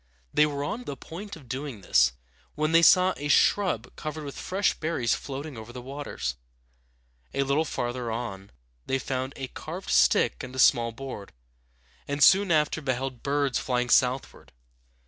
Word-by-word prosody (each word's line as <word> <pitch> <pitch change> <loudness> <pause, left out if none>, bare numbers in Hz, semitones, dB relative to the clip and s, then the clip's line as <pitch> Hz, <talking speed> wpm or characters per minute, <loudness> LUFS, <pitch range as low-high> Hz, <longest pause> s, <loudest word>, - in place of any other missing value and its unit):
They 150 - +5
were 140 -1 -3
on 230 +12 -4
the 140 - -5
point 195 +10 -8
of 145 -6 -15
doing 130 -3 -5
this, - - +3 0.4
when 155 +1 0
they 165 +1 +6
saw 185 +2 +6
a 145 - -4
shrub 150 - +2
covered 155 0 -5
with 140 -1 -7
fresh 195 +2 0
berries 155 -8 -1
floating 140 +1 -5
over 110 +2 -10
the 125 - -8
waters. 125 - -5 1.0
A 140 - +2
little 140 +4 +1
farther 120 -3 -3
on 100 -4 -5 0.4
they 135 - +1
found 130 0 -3
a 135 - -5
carved 175 +8 -7
stick 60 0 +3
and 125 - -8
a - - -7
small 120 -2 +4
board, 115 -4 -8 0.7
and 145 0 +1
soon 195 +4 +6
after 155 0 +2
beheld 130 -2 -3
birds 140 -2 0
flying 125 -1 -1
southward. 130 +1 +1
135 Hz, 165 wpm, -27 LUFS, 120-155 Hz, 1.0 s, they